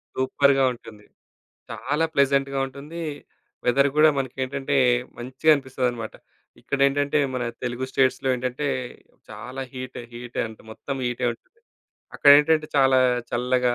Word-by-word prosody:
సూపర్‌గా 135 Hz, +1 st, +2 dB
ఉంటుంది. 105 Hz, -3 st, -14 dB, 0.7 s
చాలా 145 Hz, +5 st, -1 dB
ప్లెజెంట్‌గా 140 Hz, 0 st, +2 dB
ఉంటుంది. 145 Hz, +5 st, -9 dB, 0.6 s
వెదర్ 140 Hz, +3 st, +3 dB
కూడా 155 Hz, +1 st, +7 dB
మనకేంటంటే, 135 Hz, +1 st, -2 dB, 0.4 s
మంచిగా 130 Hz, +6 st, +1 dB
అనిపిస్తదన్నమాట. 125 Hz, -4 st, -3 dB, 0.5 s
ఇక్కడేంటంటే, 140 Hz, +1 st, +1 dB, 0.2 s
మన 125 Hz, -, -2 dB, 0.2 s
తెలుగు 125 Hz, +1 st, -3 dB
స్టేట్స్‌లో 135 Hz, 0 st, +1 dB
ఏంటంటే, 125 Hz, +3 st, -3 dB, 0.6 s
చాలా 120 Hz, +5 st, -7 dB
హీట్, 130 Hz, 0 st, -7 dB
హీట్ 120 Hz, 0 st, -9 dB
అంట 110 Hz, 0 st, -13 dB
మొత్తం 135 Hz, +5 st, -6 dB
హీటే 120 Hz, +1 st, -2 dB
ఉంటుంది. 460 Hz, -, -25 dB, 0.6 s
అక్కడేంటంటే, 150 Hz, +2 st, +6 dB
చాలా 135 Hz, -1 st, +5 dB, 0.3 s
చల్లగా 125 Hz, 0 st, +1 dB
130 Hz, 110 wpm, -24 LUFS, 125-140 Hz, 0.7 s, కూడా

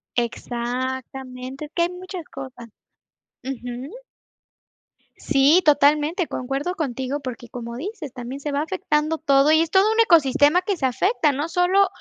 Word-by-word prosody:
Exactamente, 255 Hz, +3 st, -4 dB
es 295 Hz, -, -14 dB
que 340 Hz, -, +2 dB
hay 340 Hz, -, +1 dB
muchas 360 Hz, -1 st, -8 dB
cosas. 260 Hz, -4 st, -9 dB, 0.8 s
Ujú. 250 Hz, -, -6 dB, 1.2 s
Sí, 285 Hz, +5 st, +4 dB
totalmente, 300 Hz, +4 st, +3 dB
concuerdo 275 Hz, +8 st, -3 dB
contigo, 270 Hz, -2 st, -3 dB
porque 245 Hz, -3 st, -7 dB
como 235 Hz, -1 st, -7 dB
dices, 310 Hz, -, -6 dB
también 250 Hz, +1 st, -7 dB
se 290 Hz, +1 st, -4 dB
va 285 Hz, +1 st, 0 dB
afectando 320 Hz, -3 st, -1 dB
todo 280 Hz, -1 st, +3 dB
y 315 Hz, +1 st, +5 dB
es 330 Hz, -1 st, -1 dB
todo 395 Hz, +3 st, +4 dB
un 445 Hz, -, 0 dB
ecosistema 320 Hz, -, +5 dB
que 385 Hz, 0 st, -2 dB
se 275 Hz, -, -1 dB
afecta, 305 Hz, -, +2 dB
no 290 Hz, +4 st, -3 dB
solo 360 Hz, +3 st, +3 dB
285 Hz, 145 wpm, -23 LUFS, 260-340 Hz, 1.2 s, y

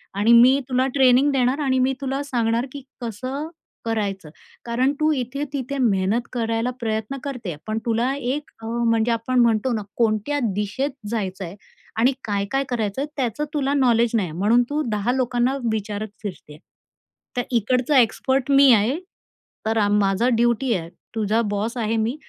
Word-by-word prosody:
आणि 210 Hz, +4 st, +4 dB
मी 250 Hz, +4 st, +7 dB
तुला 255 Hz, +1 st, +2 dB
ट्रेनिंग 265 Hz, +1 st, +5 dB
देणार 260 Hz, +1 st, +1 dB
आणि 260 Hz, -1 st, +2 dB
मी 260 Hz, +1 st, +2 dB
तुला 270 Hz, 0 st, -2 dB
सांगणार 235 Hz, -3 st, 0 dB
की 285 Hz, -2 st, -8 dB, 0.2 s
कसं 255 Hz, +6 st, -4 dB, 0.4 s
करायचं. 200 Hz, -6 st, -2 dB, 0.4 s
कारण 250 Hz, +4 st, +1 dB
तू 310 Hz, 0 st, +3 dB
इथे-तिथे 275 Hz, +1 st, -3 dB
मेहनत 205 Hz, -1 st, +2 dB
करायला 230 Hz, 0 st, -1 dB
प्रयत्न 220 Hz, +3 st, -2 dB
करतेय, 235 Hz, -, -5 dB
पण 215 Hz, 0 st, -1 dB
तुला 235 Hz, +3 st, +1 dB
एक 280 Hz, +2 st, -3 dB
अ, -, -, -6 dB
म्हणजे 230 Hz, 0 st, +1 dB
आपण 230 Hz, +2 st, 0 dB
म्हणतो 235 Hz, +1 st, +3 dB
ना 220 Hz, -, -1 dB, 0.2 s
कोणत्या 225 Hz, +5 st, +1 dB
दिशेत 210 Hz, +8 st, -2 dB, 0.2 s
जायचंय 190 Hz, -5 st, -4 dB, 0.4 s
आणि 245 Hz, +4 st, +4 dB
काय-काय 205 Hz, +6 st, -1 dB
करायचंय 230 Hz, +2 st, -1 dB
त्याचं 265 Hz, +3 st, -1 dB
तुला 280 Hz, -2 st, 0 dB
नॉलेज 240 Hz, -4 st, +3 dB
नाही 205 Hz, -5 st, +1 dB
आहे. 155 Hz, -, -8 dB
म्हणून 225 Hz, +5 st, +4 dB
तू 300 Hz, +1 st, 0 dB
10 210 Hz, +2 st, 0 dB
लोकांना 255 Hz, 0 st, +1 dB, 0.2 s
विचारत 210 Hz, 0 st, -3 dB, 0.2 s
फिरते, 175 Hz, -7 st, -8 dB, 0.8 s
तर -, -, +3 dB
इकडचा 250 Hz, +4 st, +2 dB
एक्सपर्ट 265 Hz, +4 st, +1 dB
मी 275 Hz, -1 st, +7 dB
आहे, 230 Hz, -, +2 dB, 0.7 s
तर 220 Hz, 0 st, +1 dB
माझा 205 Hz, +3 st, +2 dB
ड्युटी 240 Hz, +1 st, +2 dB
आहे. 165 Hz, -2 st, -4 dB, 0.3 s
तुझा 220 Hz, +1 st, +1 dB
बॉस 210 Hz, +4 st, -2 dB
आहे 225 Hz, -1 st, 0 dB
मी, 225 Hz, +4 st, 0 dB
235 Hz, 155 wpm, -22 LUFS, 215-265 Hz, 0.8 s, मी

